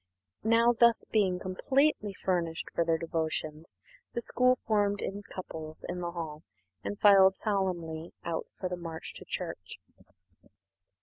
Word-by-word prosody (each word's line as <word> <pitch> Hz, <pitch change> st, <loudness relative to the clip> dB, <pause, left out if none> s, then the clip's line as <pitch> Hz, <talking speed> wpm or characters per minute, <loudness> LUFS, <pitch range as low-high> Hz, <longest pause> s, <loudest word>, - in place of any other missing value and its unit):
Now, 230 Hz, +2 st, +5 dB, 0.4 s
being 200 Hz, -4 st, +3 dB
thus -, -, -10 dB
completely 215 Hz, +4 st, +1 dB
furnished 175 Hz, -4 st, -2 dB
for 170 Hz, -, +1 dB
their 165 Hz, -1 st, +2 dB
devotions, 160 Hz, -1 st, -3 dB, 0.4 s
the 235 Hz, -, -1 dB
school 255 Hz, +2 st, +3 dB
formed 205 Hz, -4 st, 0 dB
in 200 Hz, +1 st, -4 dB
couples 160 Hz, -5 st, -8 dB
in 180 Hz, 0 st, -3 dB
the 175 Hz, -, -2 dB
hall 160 Hz, -3 st, -5 dB, 0.4 s
and 205 Hz, -, -4 dB
filed 195 Hz, -2 st, +7 dB
solemnly 175 Hz, -6 st, -2 dB
out 170 Hz, -1 st, -3 dB
for 185 Hz, -, -1 dB
the 180 Hz, 0 st, -4 dB
march 165 Hz, -2 st, -6 dB
to -, -, -11 dB
church. -, -, -5 dB
185 Hz, 135 wpm, -30 LUFS, 165-205 Hz, 0.4 s, filed